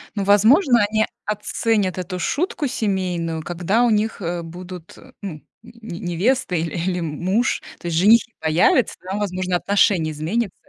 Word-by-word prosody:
Ну, 200 - -1
возможно, 235 - +5
они 215 0 +2 0.2
оценят 210 -2 -1
эту 185 0 -4
шутку 295 - -1
семейную, 180 -8 -2
когда 180 +7 0
у 240 - +3
них, 215 -1 0
э, 170 0 -3
будут, 175 0 -10
э, 260 - -16
ну, 195 -4 -5
нь 150 - -13 0.4
не 180 -6 -7
невеста, 180 +4 0
иль 165 -2 -2
или, 180 +1 -1
м 170 - -3
м - - -8
муж. 220 +7 +1 0.2
То 175 - -7
есть 165 - -1
женихи 225 +6 +5
появятся, 160 +9 +2
там, 190 +2 -3
возможно, 185 -3 -1
отношение 180 -5 +2
изменится, 185 +8 -2
190 Hz, 170 wpm, -21 LUFS, 175-220 Hz, 0.4 s, возможно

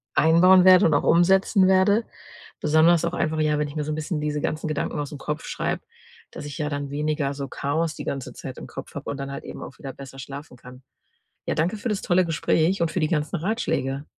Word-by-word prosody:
einbauen 180 +4 +6
werde 185 -1 +7
und 160 - +3
auch 145 - +2
umsetzen 190 +3 +4
werde 190 +4 +4 0.6
besonders 160 +2 +4
auch 170 - -2
einfach 160 -2 -1
ja, 155 -1 +2
wenn 150 - 0
ich 145 - -10
mir 150 - -1
so 155 - -3
'n - - -2
bisschen 155 +1 -3
diese 150 0 -2
ganzen 155 +2 -2
Gedanken 155 -1 -2
aus 145 -1 -4
'm - - -6
Kopf 150 +2 -4
schreibe, - - -2 0.5
dass - - -8
ich 145 - -7
ja 150 -2 -2
dann 145 -1 -4
weniger 150 0 -1
so 140 -1 -5
Chaos 155 +4 -2
die - - -7
ganze 135 -2 -4
Zeit - - -8
im - - -8
Kopf - - -9
habe - - -6
und - - -3
dann 140 0 -5
halt 140 - -6
eben - - -8
auch 130 - -10
wieder 135 -2 -7
besser 135 0 -11
schlafen 140 0 -9
kann. 125 +2 -14 0.6
Ja, - - 0
danke 170 +7 0
für 225 - -4
das 210 -3 -2
tolle 185 +1 +3
Gespräch 165 +2 +1
und 165 - +1
für 180 - -2
die 155 - +1
ganzen 150 -1 -1
Ratschläge. 155 - -2
155 Hz, 235 wpm, -24 LUFS, 145-175 Hz, 0.6 s, werde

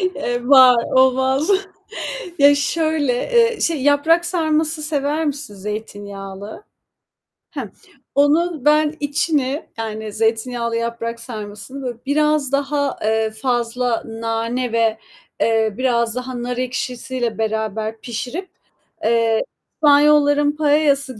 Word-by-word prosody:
Eee, 245 0 -3
var, 255 -4 +7
olmaz 265 +4 +3 0.9
Ya, 285 0 +7
şöyle, 310 -2 0
eee, 470 - +2
şey, 315 -5 0
yaprak 305 +4 +3
sarması 315 -2 0
sever 300 +1 -1
misin 280 -7 -4
zeytinyağlı? 205 - -7 0.9
Hı. 240 -8 -5 0.4
Onun 300 +1 +2
ben 300 0 +3
içini, 290 -1 -1
yani 220 -1 -5
zeytinyağlı 230 +1 -1
yaprak 230 0 -3
sarmasını, 215 +2 -8
böyle, 245 -3 -4
biraz 300 -1 +1
daha, 280 0 0
eee, 220 0 +1
fazla 240 +1 -1
nane 230 +2 -3
ve, 225 -1 +1 0.4
eee, 225 -1 +2
biraz 235 -3 +1
daha 250 -1 -5
nar 245 0 -3
ekşisiyle 250 -1 -3
beraber 220 0 -2
pişirip, 255 - -5 0.5
eee, 225 0 +2 0.3
İspanyolların 290 0 +4
paella'sı 290 -4 +1
255 Hz, 105 wpm, -20 LUFS, 225-290 Hz, 0.9 s, var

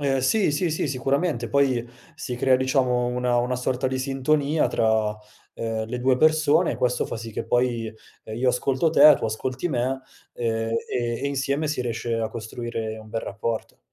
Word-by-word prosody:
Ehm, 135 -2 +1
sì, 195 - +2
sì, 165 +2 0
sì, 155 - -1
sicuramente. 135 -1 -1
Poi 130 -4 +1 0.3
si 125 - -5
crea, 130 +1 +3
diciamo, 130 -2 +1
una 125 0 0
una 125 +1 0
sorta 125 +1 -1
di 130 0 -2
sintonia 140 +3 +1
tra, 110 -1 +2 0.5
uhm, 110 -1 -3
le 125 +2 -4
2 130 +1 +2
persone 155 +3 +3
e - - -5
questo 125 0 0
fa - - -5
sì 115 -1 -7
che - - -4
poi, 120 -2 0 0.3
ehm, 110 0 -7
io 125 +1 +1
ascolto 135 +5 +1
te, 150 -1 +8
tu - - -5
ascolti 130 +8 -2
me, 130 -1 -1 0.3
ehm, 115 -1 -1 0.2
e 120 -1 -2
e 140 - 0
insieme 140 +2 -1
si 150 -3 -1
riesce 120 -1 -2
a 115 -1 -1
costruire 110 0 -5
un 110 0 -12
bel 115 +1 -3
rapporto. 110 - -4
125 Hz, 185 wpm, -24 LUFS, 115-140 Hz, 0.5 s, te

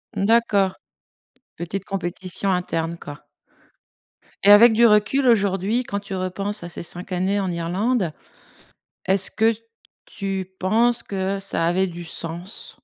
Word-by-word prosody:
D'accord, 200 -3 +2 0.8
petite 190 +3 -5
compétition 185 0 -3
interne, 170 -2 -2
quoi. 145 0 -9 1.3
Et 200 - +5
avec 225 +2 +8
du 235 +2 +5
recul 215 +5 +3
aujourd'hui, 205 +1 +2
quand 200 -3 -3
tu 195 -1 -7
repenses 195 +2 -3
à 175 - -6
ces 170 - -6
5 175 +2 -4
années 190 +3 0
en 190 -2 -1
Irlande, 180 +3 -1 0.9
est-ce 190 0 +1
que 225 +1 +2 0.5
tu 190 -1 -5
penses 230 +5 +2
que 195 0 -2
ça 180 -4 0
avait 185 +3 +2
du 175 0 -8
sens? 170 +4 -6
195 Hz, 130 wpm, -22 LUFS, 180-210 Hz, 1.3 s, avec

